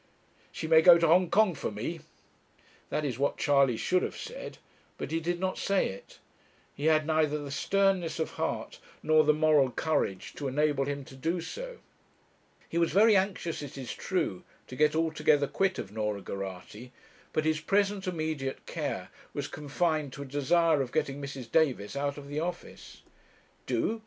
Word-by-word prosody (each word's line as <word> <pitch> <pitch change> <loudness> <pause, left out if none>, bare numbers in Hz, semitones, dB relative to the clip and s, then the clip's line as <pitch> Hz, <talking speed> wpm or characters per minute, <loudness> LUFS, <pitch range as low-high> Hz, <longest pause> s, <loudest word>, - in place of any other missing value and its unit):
'She - - -5
may 160 0 +7
go 175 0 +9
to 170 - +2
Hong 175 +2 +4
Kong 215 -3 +4
for - - -3
me.' 115 +11 -4 0.9
That 150 - -1
is 130 -3 -3
what 140 - +1
Charley 140 -4 +3
should 185 +8 +1
have - - -4
said. - - -7 0.4
But - - -5
he 165 - +1
did 175 +2 -2
not 185 0 -2
say 195 -1 +1
it. 95 +1 -11 0.6
He 145 - -5
had 155 -1 +4
neither 155 -1 +1
the 145 -2 -6
sternness 195 +2 +1
of 160 - -2
heart - - -3 0.2
nor 155 0 +5
the 150 - +5
moral 150 -3 +4
courage 120 - -1
to 145 - -3
enable 145 0 +1
him 140 -1 -4
to 130 - -13
do 165 +7 -1
so. - - -7 0.9
He 170 - -1
was 170 - +2
very 215 +3 +6
anxious, 190 -4 0
it 140 -1 -8
is 130 -3 -5
true, 165 - -2 0.2
to 125 - -9
get 150 +3 +3
altogether 155 -2 +2
quit 190 +6 0
of 95 - -6
Norah 105 -2 -2
Geraghty; 100 +5 -7 0.4
but 155 - 0
his 155 -1 +1
present 200 +2 +1
immediate 155 -6 -3
care - - -4 0.3
was - - -2
confined 150 -1 -1
to 140 - -6
a - - -9
desire 145 +3 +2
of 125 -2 -3
getting 145 -3 -1
Mrs. 135 -4 -7
Davis 135 -9 +1
out 140 0 -2
of 140 -1 -9
the 145 +1 -3
office. 175 +2 -6 0.6
'Do!' 225 - 0
155 Hz, 175 wpm, -29 LUFS, 140-170 Hz, 0.9 s, go